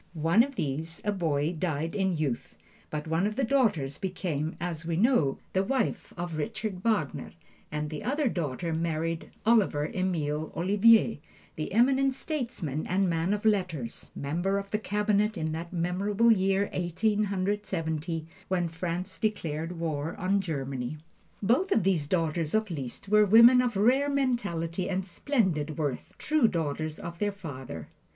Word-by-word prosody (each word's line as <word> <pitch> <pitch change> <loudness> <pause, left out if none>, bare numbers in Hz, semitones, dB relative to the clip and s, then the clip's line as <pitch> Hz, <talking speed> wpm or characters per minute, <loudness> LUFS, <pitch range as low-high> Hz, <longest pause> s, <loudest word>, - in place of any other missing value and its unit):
One 165 +6 +4
of 275 +2 -1
these, 160 - -3
a 210 - +2
boy, 160 -4 0
died 160 -1 -2
in 190 -4 0
youth, 140 -6 -3 0.3
but 150 -1 -4
one 165 +5 +1
of 215 - -4
the 270 - 0
daughters 220 - +1
became, 175 -5 -2
as 170 -2 -3
we 165 0 -2
know, 200 - +3 0.2
the 190 - +2
wife 255 +1 -1
of 175 -2 -4
Richard 215 +2 -3
Wagner, 210 - 0 0.4
and 150 0 -3
the 155 - -5
other 285 +2 +1
daughter 165 - -2
married 165 0 -2 0.2
Oliver 200 -10 +3
Emile 160 -5 -1
Ollivier, 210 +3 +4 0.4
the 155 - -4
eminent 265 +5 +3
statesman 240 - -3
and 185 0 +2
man 165 +3 0
of 210 +1 -1
letters 180 - 0
member 175 +8 -1
of 200 0 -5
the 210 - +1
Cabinet 210 0 +1
in 160 -1 -2
that 165 +2 -5
memorable 195 +6 +2
year, 195 -1 +2
Eighteen 205 +5 +1
Hundred 200 +1 -1
Seventy, 160 -2 -2 0.2
when 175 -2 0
France 170 +2 -4
declared 165 -6 -2
war 160 -1 -2
on 195 +2 +1
Germany. 135 -5 -3 0.5
Both 265 - +2
of 220 - +3
these 175 -6 +1
daughters 165 0 0
of 220 -3 +1
Liszt 140 +1 -5
were 210 +1 +5
women 230 +5 +8
of 240 -4 -1
rare 260 +7 +4
mentality 200 -12 -1
and 190 -1 -1
splendid 180 - 0
worth, 145 -5 -3
true 305 -6 +3
daughters 155 -3 -2
of 170 0 -7
their 205 -1 +1
father. 130 - -8
180 Hz, 155 wpm, -28 LUFS, 160-210 Hz, 0.5 s, women